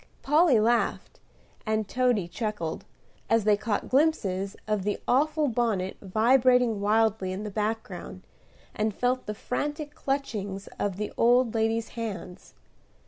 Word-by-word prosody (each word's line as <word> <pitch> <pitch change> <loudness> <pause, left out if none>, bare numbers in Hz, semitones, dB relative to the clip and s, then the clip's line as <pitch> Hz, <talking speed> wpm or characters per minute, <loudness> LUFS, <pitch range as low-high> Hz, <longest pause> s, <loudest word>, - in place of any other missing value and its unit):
Polly 295 -3 +4
laughed, 235 +2 0 0.4
and 215 -2 -1
Toady 245 -7 +1
chuckled, 175 -3 -4 0.4
as 225 -1 +3
they 210 0 +4
caught 210 0 -2
glimpses 200 -10 +1
of 210 -2 0
the 205 +2 -2
awful 300 +3 +2
bonnet 225 -6 0
vibrating 240 +2 +3
wildly 215 -2 +2
in 190 +3 -4
the 210 - -5
background, 210 -3 -4 0.5
and 215 -1 -1
felt 250 +1 0
the 210 - -3
frantic 295 +6 -3
clutchings 210 -10 -3
of 195 -2 -1
the 210 0 -4
old 240 0 +4
lady's 225 0 0
hands. 200 -5 -7
220 Hz, 130 wpm, -27 LUFS, 205-250 Hz, 0.5 s, Polly